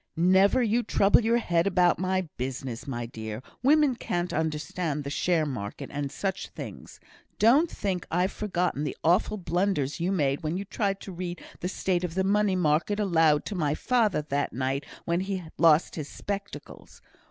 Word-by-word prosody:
"Never 190 +8 +4
you 230 +2 +2
trouble 200 -2 +4
your 230 +2 +3
head 175 -5 +1
about 180 -3 +3
my 185 -1 0
business, 130 0 -5
my 120 -3 -3
dear. 110 0 -7 0.2
Women 290 +1 +4
can't 175 -5 -2
understand 155 0 -2
the 140 - -5
share 165 +1 +1
market, 110 -8 -5
and 140 -1 -3
such 190 -1 -3
things. - - -9 0.4
Don't 275 +10 +5
think 190 -4 -3
I've 180 +3 +1
forgotten 180 -7 -1
the 150 - -4
awful 180 +5 +2
blunders 175 -6 -1
you 175 +3 0
made 145 -6 +1
when 160 +2 -2
you 200 - -4
tried 195 -1 -2
to 195 - -8
read 175 0 -5 0.2
the 180 - -3
state 185 -2 -1
of 175 -2 -3
the 190 - +1
money 200 0 +2
market 175 +4 +1
aloud 165 -7 +3
to - - -4
my 150 -6 0
father, 220 -9 +1
that 145 -1 -2
night 135 +2 -2 0.2
when 170 +1 +1
he 190 +1 -2
had 165 -3 -9
lost 165 -1 +5
his 155 -3 -5
spectacles. 200 0 -7
175 Hz, 175 wpm, -27 LUFS, 150-195 Hz, 0.4 s, Don't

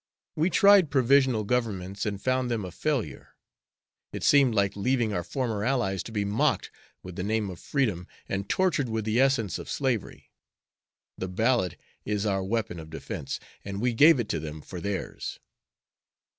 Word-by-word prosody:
We 160 +4 +2
tried 200 -3 +6
provisional 130 -3 +3
governments 100 -4 -2
and 100 -2 -3
found 130 +2 0
them 115 -5 -1
a 90 - -7
failure. 135 - -3 0.8
It - - -6
seemed 135 -5 +5
like 100 -1 +1
leaving 120 +1 0
our 90 - -1
former 110 0 -2
allies 110 -7 0
to - - -8
be 105 -2 -1
mocked 100 +2 0 0.3
with 90 -1 -9
the 90 - -2
name 105 -1 -1
of 90 - -10
freedom 105 - -1 0.2
and 100 +1 -3
tortured 170 -9 +1
with 110 -1 -2
the 110 +2 +1
essence 130 -7 +2
of - - -8
slavery. 130 -7 -2 0.9
The 95 - -2
ballot 110 0 +1 0.3
is 105 0 -1
our 95 -2 0
weapon 100 -3 -2
of 80 -1 -10
defense, 80 - -5 0.2
and 100 0 -5
we 120 +2 +1
gave 150 +4 +6
it 115 - -1
to 80 - -1
them 75 0 -7
for 90 +3 -8
theirs." 100 0 -4
110 Hz, 170 wpm, -27 LUFS, 95-130 Hz, 0.9 s, tried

